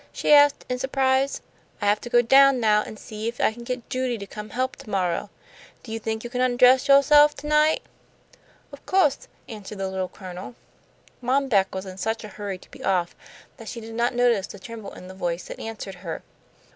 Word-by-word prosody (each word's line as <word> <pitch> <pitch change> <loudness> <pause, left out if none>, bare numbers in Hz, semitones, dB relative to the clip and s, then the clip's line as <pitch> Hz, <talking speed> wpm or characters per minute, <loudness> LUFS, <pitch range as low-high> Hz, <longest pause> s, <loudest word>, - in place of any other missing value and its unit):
she - - +2
asked, 290 -1 +5
in 250 0 -3
surprise. 265 +1 +1 0.4
"I 205 - -3
have 205 +1 +2
to 240 - -7
go 240 0 +4
down 270 +2 +6
now 210 -2 +3
an' 215 - -8
see 215 +1 -6
if 235 +1 -5
I - - +2
can 235 +1 -10
get 250 0 -5
Judy 255 -2 -2
to 200 - -7
come 210 +1 -9
help 255 +3 -2
to - - -13
morrow. 185 0 -1 0.5
Do 225 - -10
you 225 - -3
think 220 0 -4
you 240 - -6
can 250 0 -1
undress 255 +1 +4
yo'self 295 +2 +6
to 280 - -10
night?" 300 +1 +3 0.9
"Of - - -12
co'se," 370 -8 +2 0.2
answered 210 -2 -9
the 195 0 -2
Little 190 -1 -3
Colonel. 185 +4 -9 0.7
Mom 265 +2 +1
Beck 195 -4 +2
was 190 +1 -4
in 185 -1 -9
such 225 +4 -2
a 215 - -8
hurry 200 -2 -6
to - - -20
be - - -12
off 180 -3 0 0.4
that 225 - -9
she 235 - -6
did 225 0 -9
not 235 +2 0
notice 240 -5 +2
the - - -10
tremble 220 +1 -9
in 180 - -11
the 185 - -9
voice 175 -2 -3
that - - -9
answered 220 -3 -6
her. 170 -3 -6
225 Hz, 215 wpm, -24 LUFS, 200-260 Hz, 0.9 s, down